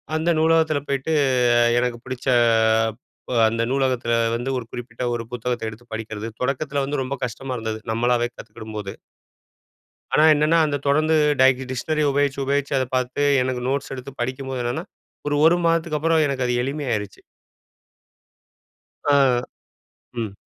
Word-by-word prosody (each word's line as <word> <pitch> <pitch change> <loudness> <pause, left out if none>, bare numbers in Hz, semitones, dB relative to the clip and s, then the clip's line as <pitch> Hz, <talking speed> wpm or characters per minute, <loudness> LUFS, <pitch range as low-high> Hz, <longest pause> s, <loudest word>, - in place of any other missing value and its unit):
அந்த 160 +2 0
நூலகத்துல 160 -2 +3
போய்ட்டு 140 +3 -1 0.4
அ - - +5 0.2
எனக்கு 125 -1 -1
புடிச்ச 130 0 -6 1.0
ப 125 - -2
அந்த 115 +1 -2
நூலகத்துல 130 -3 +1 0.2
வந்து 120 +3 -3
ஒரு 125 - -5
குறிப்பிட்ட 125 +1 -7
ஒரு 120 -1 -3
புத்தகத்த 120 -1 -3
எடுத்து 110 +3 -13
படிக்கிறது. 110 -1 -5
தொடக்கத்துல 140 +2 -1
வந்து 140 0 -2
ரொம்ப 135 +2 -3
கஷ்டமா 130 +3 -6
இருந்தது, 110 -1 -4
நம்மளாவே 120 +1 +1
கத்துக்கிடும்போது. 105 -2 -8 1.2
ஆனா, 155 - +5
என்னன்னா 155 +2 +3
அந்த 145 -2 -1
தொடந்து 155 +3 +3 0.3
டை 130 - +8 0.2
டிஷ்னரி 155 +4 -1
உபயோச்சு 140 0 0
உபயோச்சு 140 +1 0
அத 130 - +1
பாத்து 130 +2 -1 0.2
எனக்கு 125 -1 -2
நோட்ஸ் 140 +1 -2
எடுத்து 130 +1 -8
படிக்கும்போது 130 +1 -3
என்னென்னா, 120 +1 -3 0.4
ஒரு 145 - +1
ஒரு 170 +2 +5
மாதத்துக்கு 165 -2 +1
அப்புறம் 160 0 +3
எனக்கு 135 -2 -1
அது 125 - 0
எளிமை 140 +3 -3
ஆயிருச்சு. 105 -3 -4 1.9
ஆ, 130 -3 +3 0.7
ம். 110 -4 -3
130 Hz, 140 wpm, -22 LUFS, 120-145 Hz, 1.9 s, டை